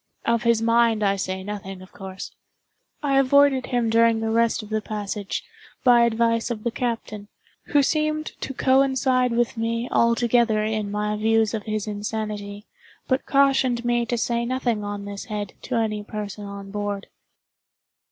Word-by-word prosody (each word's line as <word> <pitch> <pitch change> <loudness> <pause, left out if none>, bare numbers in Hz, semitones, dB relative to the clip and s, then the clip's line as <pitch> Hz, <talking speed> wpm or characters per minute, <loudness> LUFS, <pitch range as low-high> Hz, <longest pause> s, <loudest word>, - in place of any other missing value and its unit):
Of 235 0 +2
his 235 -1 +2
mind 230 -1 +3
I 200 -1 +3
say 190 -1 -3
nothing, 195 -2 -6
of 185 - -16
course. 190 -1 -8 0.7
I 275 -2 +3
avoided 275 -1 +4
him 245 -2 0
during 230 0 +4
the 220 0 -1
rest 230 0 +2
of 210 - -11
the 215 0 -1
passage, 205 -1 -4 0.4
by 240 -2 +6
advice 230 0 +1
of 220 -3 -4
the 235 - -1
captain, 225 -4 -4 0.4
who 290 -1 +3
seemed 310 +1 0
to - - -3
coincide 260 -1 +3
with 235 0 0
me 230 +1 -1
altogether 235 -2 +3
in 215 -1 -2
my 210 +1 -1
views 220 0 +2
of 215 -2 -3
his 215 -1 -2
insanity, 210 -1 -5 0.4
but 260 +1 0
cautioned 265 -3 +3
me 240 -1 +1
to 240 - -1
say 235 0 0
nothing 240 -3 -1
on 205 0 -5
this 200 0 -6
head 210 -2 -5
to 250 - -4
any 215 -2 -1
person 210 -1 -6
on 200 0 -8
board. 205 -1 -3
225 Hz, 160 wpm, -24 LUFS, 210-240 Hz, 0.7 s, by